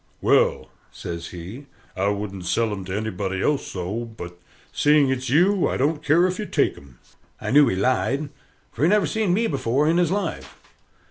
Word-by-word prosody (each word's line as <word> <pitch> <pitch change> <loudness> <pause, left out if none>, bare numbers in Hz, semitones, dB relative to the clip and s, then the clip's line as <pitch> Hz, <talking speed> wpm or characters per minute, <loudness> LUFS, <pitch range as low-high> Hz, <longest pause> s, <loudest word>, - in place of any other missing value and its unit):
"Well," - - +2 0.2
says 85 -1 -6
he, 95 +11 -9 0.3
"I 95 +1 0
wouldn't 100 -3 -3
sell 110 +5 +1
'em 95 -2 -5
to 95 +2 -3
anybody 95 -3 -3
else 150 -2 0
so, 95 +6 -4
but, 90 -6 -9 0.4
seeing 145 -2 +3
it's 130 -1 -2
you, 180 +7 +3
I - - -2
don't 150 +3 0
care 165 +5 +4
if 185 +1 -2
you 210 - -4
take - - +1
'em." 65 -3 -16 0.4
I - - -4
knew 145 +1 +6
he - - 0
lied, 130 +7 0 0.4
for - - -9
he 160 - +4
never 210 0 +3
seen 220 -4 0
me 220 +6 +2
before 140 - 0
in 165 +2 +3
his 175 -2 +2
life. 190 -2 -3
130 Hz, 190 wpm, -23 LUFS, 95-160 Hz, 0.4 s, knew